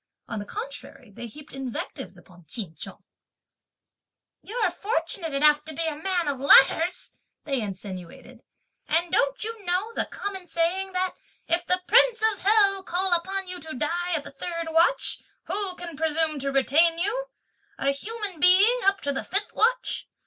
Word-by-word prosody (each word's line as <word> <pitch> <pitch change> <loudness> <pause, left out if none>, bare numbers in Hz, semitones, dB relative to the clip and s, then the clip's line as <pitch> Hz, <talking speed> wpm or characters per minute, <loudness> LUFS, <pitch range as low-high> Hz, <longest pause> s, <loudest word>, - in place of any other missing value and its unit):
On 230 - -4
the 205 - -6
contrary, 440 - -8
they 235 +4 -8
heaped 295 +6 -13
invectives 245 -8 -6
upon 175 -1 -18
Ch'in 200 -9 -5
Chung. - - -9 1.4
"You're 475 +4 -1
fortunate 335 -3 -3
enough 295 +1 +3
to 315 -1 -8
be 330 - 0
a 315 -2 -2
man 350 +1 -1
of 280 -2 -2
letters," 320 +6 +5 0.3
they 275 -4 -1
insinuated, 190 -3 -8 0.5
"and 340 +1 +1
don't 275 +5 +1
you 450 -1 -5
know 375 +5 -1
the - - 0
common 385 -3 -6
saying 350 +4 -1
that: 370 0 -1 0.3
'if 345 +1 0
the 365 0 +2
Prince 485 +1 +4
of 395 - -11
Hell 400 -1 +4
call 370 0 0
upon 380 +3 -1
you 360 0 -5
to 315 -3 -8
die 350 +6 -1
at 300 - -2
the - - -9
third 335 +3 -4
watch, 335 +10 +2 0.2
who 395 -3 -3
can 345 -3 -8
presume 315 0 -1
to 275 +1 -1
retain 315 +5 +3
you, 445 +8 -1 0.5
a 275 - +1
human 405 +4 -5
being, 390 +9 +6
up 390 0 +3
to 285 - -1
the 270 - -3
fifth 400 +2 -2
watch?' - - +1
340 Hz, 165 wpm, -25 LUFS, 285-390 Hz, 1.4 s, being